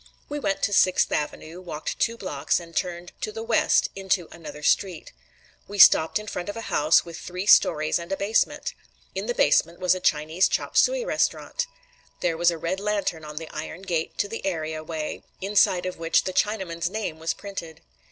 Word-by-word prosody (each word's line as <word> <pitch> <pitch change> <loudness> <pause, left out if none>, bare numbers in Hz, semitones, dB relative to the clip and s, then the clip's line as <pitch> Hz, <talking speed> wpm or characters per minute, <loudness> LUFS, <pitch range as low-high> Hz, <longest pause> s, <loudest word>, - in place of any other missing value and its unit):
We 295 0 -3
went 195 -7 -1
to 205 - +1
Sixth 185 -2 +4
Avenue, 155 +3 -3
walked 155 -4 -5
two 230 0 +1
blocks, 150 -9 -1
and 170 -1 -13
turned 175 -1 -3
to 430 - -2
the 450 +1 -6
west 460 - +2
into 190 -3 0
another 155 -3 -10
street. 180 +1 0 0.5
We 205 - -7
stopped 160 -4 +7
in 210 - -6
front 180 -3 -5
of 205 - -5
a 230 - -6
house 155 +2 +4
with 170 -1 -8
three 180 +2 -5
stories 155 -5 +4
and 170 +2 -8
a 195 - 0
basement. 205 +3 0 0.4
In - - -4
the 485 - -1
basement 335 - +3
was 180 0 +3
a 185 - -3
Chinese 160 +2 +2
chop - - -2
suey - - +3
restaurant. - - -1 0.5
There 170 -2 +1
was 170 +1 +4
a 170 - -2
red 170 +4 -2
lantern 200 -6 -1
at 150 0 -9
the 160 0 -5
iron 160 +4 -7
gate 165 -4 -2
to 205 - 0
the 225 +2 -6
area 160 -4 -3
way, 155 -1 -5 0.2
inside 195 -2 +2
of 185 -2 -5
which 165 0 +2
the 185 - -3
Chinaman's 180 -6 -1
name 195 -6 -4
was 160 +1 -1
printed. 180 -6 -8
180 Hz, 195 wpm, -25 LUFS, 160-200 Hz, 0.5 s, stopped